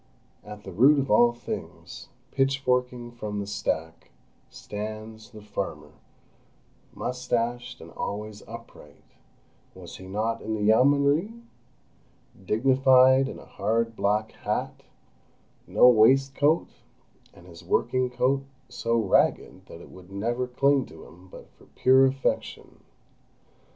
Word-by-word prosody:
At 105 0 -11
the 95 - -9
root 130 +11 +5
of 135 -3 -1
all 120 +3 +5
things, 120 0 -8 0.2
pitchforking 125 -3 0
from 105 -3 -5
the 100 - -4
stack, 80 -6 -4 0.4
stands—the 110 +1 -8
farmer, 105 0 -6 1.0
moustached, 120 -1 -3
and - - -12
always 105 0 -6
upright 115 -10 -13 0.7
was - - -11
he 95 - -11
not 110 +4 -2
in 110 0 -3
the 105 - -3
Yeomanry?—dignified 135 - +1
in - - -8
a - - -13
hard 115 +3 -2
black 105 +1 0
hat, - - -4 0.9
no - - +5
waistcoat, 135 +6 +3 0.6
and 85 - -18
his 85 -1 -14
working 125 +8 0
coat 130 +2 0 0.3
so 115 0 -1
ragged 95 -2 +1
that 85 - -12
it - - -14
would 95 0 -15
never 120 +5 -2
cling 135 +1 +1
to 80 - -13
him 90 +2 -17
but - - -13
for - - -22
pure 130 +1 +5
affection. 135 0 -3
115 Hz, 115 wpm, -26 LUFS, 105-130 Hz, 1.0 s, root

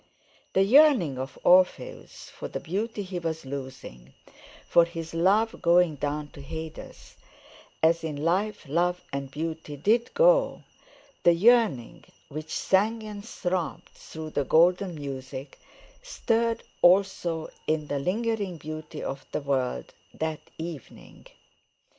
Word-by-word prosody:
The 190 - +4
yearning 230 - +5
of 130 +1 -6
Orpheus 185 - +2
for - - -7
the - - -5
beauty 205 +5 -3
he 185 -1 -5
was 160 -3 -4
losing, 130 - -8 0.5
for 170 - +6
his 165 -1 -6
love 200 +7 +2
going 175 -1 +4
down 145 +1 -3
to 140 - -12
Hades, 160 +3 -9 0.7
as 165 +1 +4
in 155 -2 -3
life 195 +1 0
love 175 +4 0
and 140 -1 -3
beauty 155 0 -5
did 225 - +2
go—the - - +1
yearning 210 - +3 0.3
which 155 +2 -7
sang 220 +4 +1
and 210 -1 -7
throbbed 180 -5 -3
through 155 -1 -9
the 145 - 0
golden 175 +5 +3
music, 135 -1 -7 0.4
stirred 230 - 0 0.2
also 175 -3 +3 0.2
in 155 -1 0
the 145 -1 -2
lingering 200 +2 -1
beauty 155 0 -7
of 135 0 -5
the - - -2
world 130 - -2 0.2
that 160 -1 -2 0.2
evening. 160 -5 -9
165 Hz, 125 wpm, -27 LUFS, 150-200 Hz, 0.7 s, for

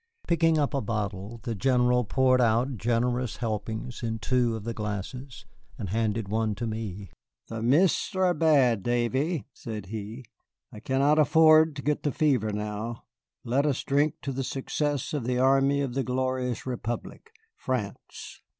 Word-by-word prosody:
Picking 165 -1 +3
up 145 0 0
a 140 - 0
bottle, 105 0 -4
the 120 -3 -2
General 125 +2 +2
poured 130 +2 +3
out 120 +3 +2
generous 120 +2 0
helpings 110 +1 -4
in 115 -2 -2
two 120 -1 +1
of 110 - -6
the 115 +1 -3
glasses, 110 +5 -6 0.3
and 100 - -5
handed 110 0 -1
one 110 0 0
to 115 - -4
me. 105 -4 -5 0.4
"The 115 -1 -5
mists 150 +12 +2
are 185 -1 +3
bad, 140 - +3
Davy," 125 - 0
said 110 -4 -7
he; 110 +4 -6 0.5
"I - - -9
I - - -8
cannot 140 +6 +2
afford 155 +1 +6
to 140 - -5
get 150 0 0
the 145 - 0
fever 130 -9 +1
now. 105 +2 -4 0.4
Let 135 +5 +1
us 140 - -1
drink 145 +2 +1 0.3
success 140 +1 -2
to 150 - -1
the 125 0 -1
army 135 +2 +3
of 135 -3 -2
the 135 - 0
glorious 130 -1 -2
Republic, 120 - -5 0.3
France." 125 -6 -5
125 Hz, 155 wpm, -27 LUFS, 110-140 Hz, 0.5 s, afford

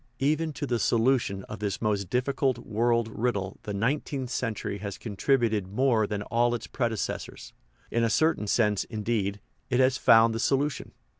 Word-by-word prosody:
Even 155 +3 +1
to 145 - -4
the 120 -4 -1
solution 115 -5 +1
of - - -8
this 100 -2 -2
most 105 -4 -1
difficult 130 0 0
world 115 0 0
riddle 100 -5 -2
the 105 - -6
nineteenth 130 +3 -1
century 110 -4 -3
has 100 -2 -5
contributed 110 -2 0
more 110 +1 +2
than 105 -1 -3
all 120 +2 +1
its 120 - -6
predecessors; 115 -5 -4 0.4
in 115 - +1
a 115 - +2
certain 155 -3 +2
sense, 105 -2 +2
indeed, 105 -2 -2 0.3
it 125 -1 +1
has 130 0 +3
found 115 0 +6
the 115 - -3
solution. 140 +4 0
115 Hz, 160 wpm, -27 LUFS, 105-130 Hz, 0.4 s, found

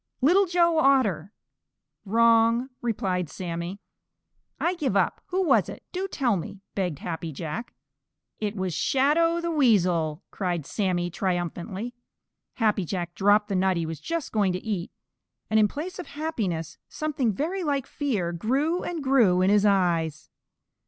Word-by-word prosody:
"Little 365 +9 +4
Joe 340 -2 +3
Otter!" 225 - +2 0.7
"Wrong," 230 +3 +4
replied 185 -7 -1
Sammy. 175 +3 -5 0.8
"I 350 - +1
give 275 - 0
up. - - +1
Who 380 0 0
was 350 - +3
it? - - -9
Do 375 +1 -2
tell 250 - +1
me," 190 +3 -8
begged 180 -7 -2
Happy 165 +1 -5
Jack. 155 - -6 0.6
"It 210 -1 -2
was 185 -3 -2
Shadow 310 - +2
the 340 0 -2
Weasel!" 180 - +2
cried 175 -6 -2
Sammy, 180 -3 -1
triumphantly. 185 +5 -3 0.6
Happy 215 -4 +1
Jack 175 0 -4
dropped 205 +3 +3
the 200 - -2
nut 185 -1 +2
he 165 - -1
was 160 -2 -5
just 330 - -3
going 200 -4 +2
to 185 - -5
eat, 195 -5 -2 0.6
and 220 - +5
in 210 - +5
place 320 - -6
of 360 - -6
happiness 220 - -3
something 290 -7 -1
very 340 - -2
like 280 -4 0
fear 215 - -2
grew 275 - 0
and 335 -4 -4
grew 225 -10 +4
in 190 - +4
his 210 0 +4
eyes. 170 -5 +1
210 Hz, 150 wpm, -26 LUFS, 180-280 Hz, 0.8 s, and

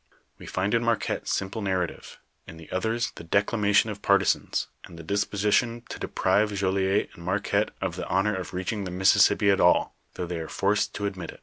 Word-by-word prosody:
"We - - -11
find 100 +3 -1
in 115 0 +2
Marquette 115 -2 -1
simple 100 +3 -2
narrative, 95 -4 -3 0.3
in 80 - -10
the 80 -1 -13
others, 115 +5 -1
the - - -8
declamation 105 +4 +2
of 100 -1 -8
partisans, 100 -1 +1 0.2
and 85 - -13
the 85 - -9
disposition 105 +5 0
to - - -7
deprive 105 +1 +1
Jolliet 95 0 +1
and 85 - -13
Marquette 100 +3 0
of - - -3
the - - -4
honor 95 +3 +1
of 95 -1 -5
reaching 95 +3 -3
the - - -4
Mississippi 95 +2 +4
at 100 - +2
all, 90 - +3 0.2
though 90 - -3
they 85 -1 -4
are 80 - -6
forced 100 +2 0
to 100 - -3
admit 95 -4 -4
it. - - -10
100 Hz, 195 wpm, -26 LUFS, 95-105 Hz, 0.3 s, Mississippi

